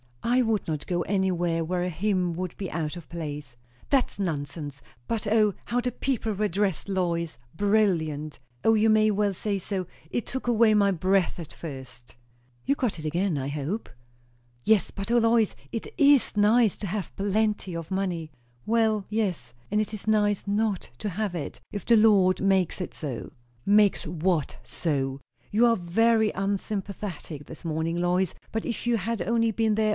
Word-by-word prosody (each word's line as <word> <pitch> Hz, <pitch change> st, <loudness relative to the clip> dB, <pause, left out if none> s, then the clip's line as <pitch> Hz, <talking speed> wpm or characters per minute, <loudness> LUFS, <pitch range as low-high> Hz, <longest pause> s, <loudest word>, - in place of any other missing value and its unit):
"I 245 Hz, +2 st, +3 dB
would 225 Hz, -4 st, 0 dB
not 155 Hz, -2 st, -3 dB
go 175 Hz, -1 st, 0 dB
anywhere 175 Hz, -3 st, 0 dB
where 175 Hz, +2 st, -1 dB
a 180 Hz, -, -1 dB
hymn 180 Hz, 0 st, 0 dB
would 180 Hz, +1 st, -4 dB
be 195 Hz, -3 st, -4 dB
out 155 Hz, -1 st, -2 dB
of 170 Hz, -3 st, -9 dB
place." 150 Hz, -6 st, -6 dB, 0.3 s
"That's 270 Hz, -6 st, +1 dB
nonsense. 145 Hz, -5 st, -4 dB, 0.3 s
But 220 Hz, -2 st, -2 dB
O, 210 Hz, -1 st, +4 dB
how 245 Hz, -, 0 dB
the 250 Hz, +1 st, -1 dB
people 240 Hz, -3 st, -1 dB
were 210 Hz, +2 st, 0 dB
dressed, 195 Hz, 0 st, -1 dB
Lois! 170 Hz, -7 st, -1 dB, 0.2 s
Brilliant! 165 Hz, -8 st, +1 dB, 0.2 s
O 225 Hz, -, +5 dB
you 220 Hz, 0 st, +4 dB
may 215 Hz, 0 st, +5 dB
well 205 Hz, -1 st, +1 dB
say 200 Hz, +1 st, -1 dB
so. 190 Hz, 0 st, -3 dB, 0.2 s
It 240 Hz, -, -2 dB
took 260 Hz, -1 st, -5 dB
away 230 Hz, -2 st, +5 dB
my 205 Hz, -1 st, +4 dB
breath 185 Hz, +1 st, +1 dB
at 170 Hz, -4 st, -8 dB
first" 130 Hz, -6 st, -9 dB, 0.5 s
"You -, -, +3 dB
got 245 Hz, -10 st, -1 dB
it 155 Hz, -, -7 dB
again, 170 Hz, +2 st, 0 dB
I 135 Hz, 0 st, -2 dB
hope?" 150 Hz, +10 st, -3 dB, 0.7 s
"Yes. 220 Hz, -, +3 dB
But 195 Hz, +3 st, -5 dB
O, 240 Hz, -, +5 dB
Lois, 230 Hz, -2 st, +3 dB, 0.2 s
it 230 Hz, -, -4 dB
is 285 Hz, -5 st, +5 dB
nice 215 Hz, +1 st, +4 dB
to 205 Hz, -, -4 dB
have 190 Hz, -1 st, -4 dB
plenty 205 Hz, -2 st, 0 dB
of 165 Hz, 0 st, -6 dB
money." 180 Hz, -5 st, -2 dB, 0.3 s
"Well, 220 Hz, -2 st, +2 dB
yes. 200 Hz, -, -2 dB, 0.2 s
And 210 Hz, -, +1 dB
it 215 Hz, -, -4 dB
is 215 Hz, 0 st, -7 dB
nice 210 Hz, -2 st, +2 dB
not 205 Hz, -1 st, 0 dB
to 210 Hz, -, -2 dB
have 200 Hz, 0 st, -2 dB
it 155 Hz, -, -5 dB
if 205 Hz, -, -5 dB
the 235 Hz, -, +5 dB
Lord 200 Hz, -4 st, +5 dB
makes 190 Hz, -3 st, +2 dB
it 180 Hz, -, -5 dB
so." 135 Hz, -7 st, -5 dB, 0.3 s
"Makes 205 Hz, -3 st, +4 dB
what 165 Hz, -1 st, 0 dB
so? 135 Hz, +1 st, -2 dB, 0.3 s
You 225 Hz, +4 st, +4 dB
are 230 Hz, -, +4 dB
very 220 Hz, +5 st, +3 dB
unsympathetic 195 Hz, -5 st, -4 dB
this 160 Hz, -, -11 dB
morning, 160 Hz, +1 st, -1 dB
Lois! 175 Hz, +1 st, +1 dB, 0.2 s
But 225 Hz, -, -2 dB
if 240 Hz, 0 st, -3 dB
you 240 Hz, -1 st, +3 dB
had 225 Hz, +1 st, -2 dB
only 230 Hz, +4 st, +2 dB
been 220 Hz, 0 st, +1 dB
there. 215 Hz, 0 st, +2 dB
195 Hz, 175 wpm, -27 LUFS, 170-215 Hz, 0.7 s, O